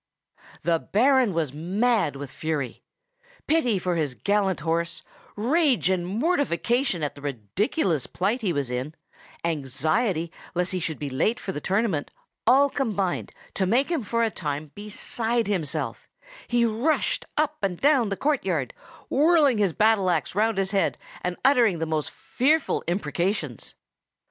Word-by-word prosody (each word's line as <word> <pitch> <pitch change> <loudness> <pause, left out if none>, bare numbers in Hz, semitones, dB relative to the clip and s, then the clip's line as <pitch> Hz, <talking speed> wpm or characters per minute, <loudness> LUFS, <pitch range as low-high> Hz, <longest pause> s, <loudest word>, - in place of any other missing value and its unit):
The 165 -1 +2
Baron 255 - +3
was 160 -6 -1
mad 195 - +1
with 140 -1 -7
fury. 150 -5 -3 0.6
Pity 280 -10 +2
for 180 -1 -1
his 150 -6 -1
gallant 200 -3 +1
horse, 170 +2 -1 0.3
rage 255 - +2
and 175 -2 0
mortification 240 - 0
at 145 - -1
the 145 - -13
ridiculous 145 - -1
plight 210 +7 -1
he 200 -5 0
was 140 -5 -1
in, 130 +5 -3 0.5
anxiety 160 - 0 0.2
lest 180 +1 0
he 185 - -1
should 160 -2 -3
be 145 - -4
late 160 - +1
for 190 - -4
the 150 - -5
tournament, 195 -6 0 0.4
all 270 +4 +6
combined 210 -10 -1 0.2
to 190 - 0
make 250 - +2
him 335 -5 0
for 230 +2 0
a 225 - +1
time 150 -3 -4
beside 225 +3 -1
himself; 185 -8 -2 0.4
he 240 -1 +2
rushed 235 +8 0
up 305 0 +1
and 190 -4 -1
down 275 -6 +4
the 195 - -2
courtyard, 190 - 0 0.3
whirling 295 -5 +4
his 200 -4 +3
battle 210 0 +3
axe 155 -9 0
round 215 +2 +1
his 195 0 0
head, 200 -2 +1 0.2
and 180 0 -3
uttering 240 -9 +5
the 165 - -1
most 155 -2 -1
fearful 300 +4 0
imprecations. 170 - -2
195 Hz, 150 wpm, -25 LUFS, 160-240 Hz, 0.6 s, all